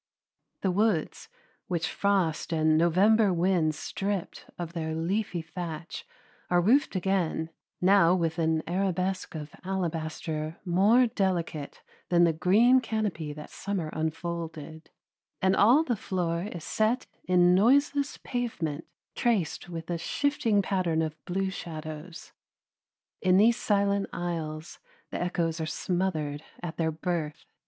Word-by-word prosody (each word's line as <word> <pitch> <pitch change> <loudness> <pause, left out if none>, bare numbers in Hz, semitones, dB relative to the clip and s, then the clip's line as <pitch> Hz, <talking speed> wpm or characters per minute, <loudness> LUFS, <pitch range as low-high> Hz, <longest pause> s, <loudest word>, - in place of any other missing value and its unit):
The 190 - +1
woods, 200 -4 0 0.4
which 165 -2 -1
frost 190 -6 0
and 155 -1 +3
November 195 +6 +4
winds 170 -3 +1
stripped 195 -2 -4
of 170 -1 -5
their 160 -2 -3
leafy 175 +1 -1
thatch, 165 -1 -6 0.4
are 175 - +4
roofed 230 +7 +3
again, 180 -3 0 0.3
now 185 -2 +5
with 165 -2 -1
an 160 -1 +1
arabesque 185 0 -1
of 150 -1 -6
alabaster 160 -3 -3
more 200 +8 +5
delicate 180 -9 -2 0.3
than 175 -1 +5
the 170 -1 +4
green 215 +10 +5
canopy 205 -10 -2
that 150 0 -10
summer 185 -6 -3
unfolded, 160 -1 -4 0.5
and 190 0 +3
all 245 +11 +6
the 245 -7 0
floor 175 -3 -2
is 170 -3 -7
set 220 +7 0 0.2
in 180 -1 +5
noiseless 280 +8 +3
pavement, 165 - -3 0.3
traced 210 -8 0
with 165 -1 -6
a 170 - -2
shifting 230 - +1
pattern 175 -5 0
of 155 -1 -6
blue 190 +1 -1
shadows. 160 -1 -8 0.9
In 185 0 +4
these 225 +4 +5
silent 200 -1 +1
aisles 160 -2 -4 0.3
the - - -3
echoes 165 -2 -1
are 160 - -2
smothered 160 -5 -2 0.2
at 170 -2 -5
their 160 -1 +1
birth. 160 -2 -3
175 Hz, 125 wpm, -28 LUFS, 160-195 Hz, 0.9 s, all